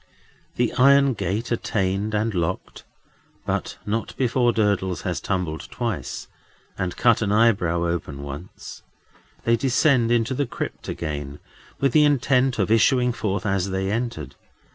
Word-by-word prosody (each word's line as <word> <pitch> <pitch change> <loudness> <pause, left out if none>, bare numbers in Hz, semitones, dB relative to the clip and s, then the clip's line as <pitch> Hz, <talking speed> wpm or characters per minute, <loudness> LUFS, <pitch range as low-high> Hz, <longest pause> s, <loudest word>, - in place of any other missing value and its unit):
The 120 -1 0
iron 140 +1 +6
gate 100 +3 -3
attained 105 -2 -1
and 110 +1 0
locked—but 90 0 -5
not 110 +2 -3
before 125 -1 +2
Durdles 100 -5 0
has - - -2
tumbled 85 -4 -3
twice, 105 - -4 0.5
and 90 -2 -3
cut 120 -2 +4
an 105 -2 0
eyebrow 100 -6 +3
open 80 -5 -3
once—they 80 +9 -6
descend 130 -2 +3
into 120 +1 +1
the 140 +1 -1
crypt - - -6
again, 75 -3 -4 0.4
with 135 -2 +2
the 150 +4 +5
intent 135 -3 +2
of - - 0
issuing 125 +2 +4
forth 105 -3 -2
as 100 -1 0
they 95 +1 -1
entered. 110 - -3
110 Hz, 130 wpm, -23 LUFS, 90-120 Hz, 0.5 s, iron